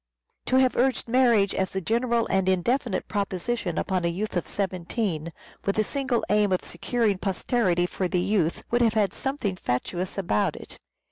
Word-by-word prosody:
To 255 - +2
have 260 -1 +4
urged 260 0 +1
marriage 235 -5 +4
as 190 0 -2
a - - +1
general 235 +4 +1
and 190 -1 +2
indefinite 230 +5 0
proposition 200 -1 -2
upon 185 -2 0
a - - +2
youth 190 +5 -3
of 175 - -1
seventeen, 185 -3 -2 0.3
with 200 - 0
the 215 - +2
single 265 0 -1
aim 210 -1 +3
of 185 - +1
securing 210 +1 -1
posterity 190 -2 +1
for 185 +1 -2
the 180 - 0
youth, 180 -3 0
would 240 +1 +3
have 225 -2 +3
had 205 -3 +2
something 265 -8 -2
fatuous 180 +6 -3
about 170 - +1
it. - - -10
200 Hz, 175 wpm, -26 LUFS, 180-235 Hz, 0.3 s, have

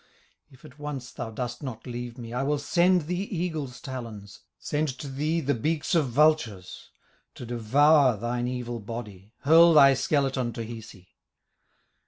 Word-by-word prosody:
"If 130 +1 -18
at 145 -1 -15
once 140 -4 -6
thou - - -6
dost 120 +2 -5
not 130 -6 -7
leave 120 -1 -6
me, 115 -1 -8
I 125 - -1
will 145 +2 0
send 175 +4 +2
the 175 +4 -3 0.2
eagle's 155 -7 -3
talons, 115 -6 -8 0.2
Send 150 +1 -2
to 145 - -7
thee 150 +5 -1
the 145 -1 0
beaks 150 - -1
of 155 -6 +2
vultures, 125 - +1 0.5
To - - -8
devour 130 +3 +4
thine 120 +3 -2
evil 120 -1 -4
body, 105 -3 -8
Hurl 165 +3 +6
thy 140 -2 +8
skeleton 135 -3 0
to 115 - -5
Hisi. 110 -5 -11
130 Hz, 155 wpm, -26 LUFS, 120-150 Hz, 0.5 s, thy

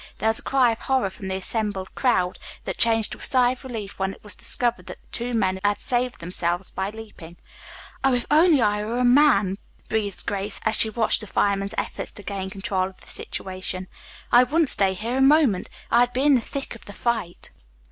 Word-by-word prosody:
There 220 - +1
was 220 - +2
a - - -10
cry 260 -3 +3
of 225 - -5
horror 260 -7 0
from 190 +1 -9
the 190 - -2
assembled 195 0 -3
crowd 185 -9 +1 0.2
that - - -5
changed 225 -2 +3
to - - -7
a - - -13
sigh 250 -2 +3
of 255 - -8
relief 225 -7 -7
when 190 0 -1
it - - -23
was 210 - 0
discovered 240 -1 -1
that - - -8
the - - -32
two 245 0 -2
men 190 -3 +1
had 205 0 +1
saved 245 0 -1
themselves 175 +1 -2
by 190 +1 -3
leaping. 210 -6 -11 0.7
"Oh, 270 -2 +4
if 245 - -2
only 310 -3 +5
I 210 0 +1
were 225 +3 -3
a 250 - +1
man," 245 -7 +4 0.3
breathed 210 -3 -2
Grace, 200 0 -2
as 220 0 +4
she 220 - +6
watched 220 +1 +1
the 215 - -8
firemen's 200 +1 0
efforts - - -3
to 205 - -8
gain 195 -1 -4
control 190 -1 -2
of 190 - -20
the - - -17
situation. 185 0 -5 0.4
"I 240 - +8
wouldn't 295 +4 +2
stay 190 -1 +3
here 230 +6 -3
a - - +2
moment. 270 -8 +4 0.2
I'd 245 +1 +4
be 260 - 0
in 290 0 +5
the 250 - +4
thick 275 +4 -6
of 230 - -14
the 205 - -10
fight." 225 -8 -3
220 Hz, 220 wpm, -24 LUFS, 195-245 Hz, 0.7 s, I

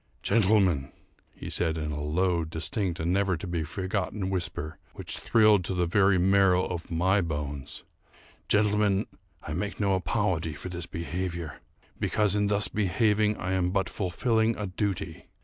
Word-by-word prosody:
"Gentlemen," 95 -10 +2 0.4
he - - -10
said, 80 -2 0
in 75 -1 -3
a 75 0 -4
low, 85 +3 +1
distinct, 85 +3 -2
and 85 +2 0
never 95 -2 +1
to 85 - -7
be 85 -2 -2
forgotten 95 +2 -3
whisper 85 -4 -3
which - - -2
thrilled 105 -4 +4
to 95 - -2
the 90 -1 +1
very 95 +2 +3
marrow 95 0 +4
of 85 -2 -5
my 95 +4 +2
bones, 75 -4 -5 0.7
"Gentlemen, 105 -1 +2 0.4
I 75 - -5
make 100 +5 -3
no 100 -2 +2
apology 95 -3 0
for 90 - -6
this 90 -1 -6
behaviour, 85 0 -4 0.4
because 105 -2 +1
in 105 0 +1
thus 100 0 +3
behaving, 105 +1 +1
I 95 - -3
am 90 -1 +1
but 95 +1 0
fulfilling 110 +4 0
a 105 - -3
duty. 100 0 -3
95 Hz, 155 wpm, -27 LUFS, 85-100 Hz, 0.7 s, thrilled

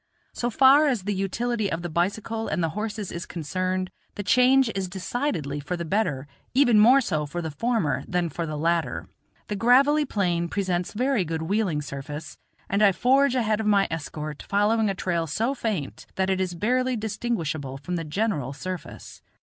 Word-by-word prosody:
So 240 - -1
far 270 +5 +6
as 245 -9 0
the 205 +1 -1
utility 215 +3 -1
of 165 +1 -3
the - - -2
bicycle 205 +7 -1
and 175 - -1
the 165 - +1
horses 210 +2 -4
is 170 +1 -6
concerned, 185 +3 -2 0.2
the 205 - -4
change 250 +3 +4
is 190 -2 -3
decidedly 180 - -2
for 165 +5 -4
the 170 - -4
better, 160 -8 0 0.3
even 245 -5 +5
more 250 +6 +7
so 155 - -1
for 175 +4 -5
the 160 -2 -4
former 225 -1 0
than 180 -1 0
for 165 +1 -4
the 155 -1 -4
latter. 165 +2 0 0.4
The 210 - -3
gravelly 275 +8 +4
plain 175 -7 0
presents 180 -2 -1
very 250 -1 +1
good 160 -1 -3
wheeling 180 -4 0
surface, 145 +2 -7 0.3
and 200 +2 0
I 200 -2 +6
forge 265 +4 +3
ahead 220 -4 +1
of 220 - -1
my 200 -2 +4
escort, 150 -1 -5
following 210 +2 +2
a 195 - -1
trail 170 -3 -1
so 225 - 0
faint 210 - -4
that 190 0 +1
it 190 0 0
is 180 -2 -2
barely 255 +7 +1
distinguishable 200 - -3
from 175 +6 -4
the 165 - -2
general 155 - -1
surface. 185 +4 -7
190 Hz, 180 wpm, -25 LUFS, 165-225 Hz, 0.4 s, more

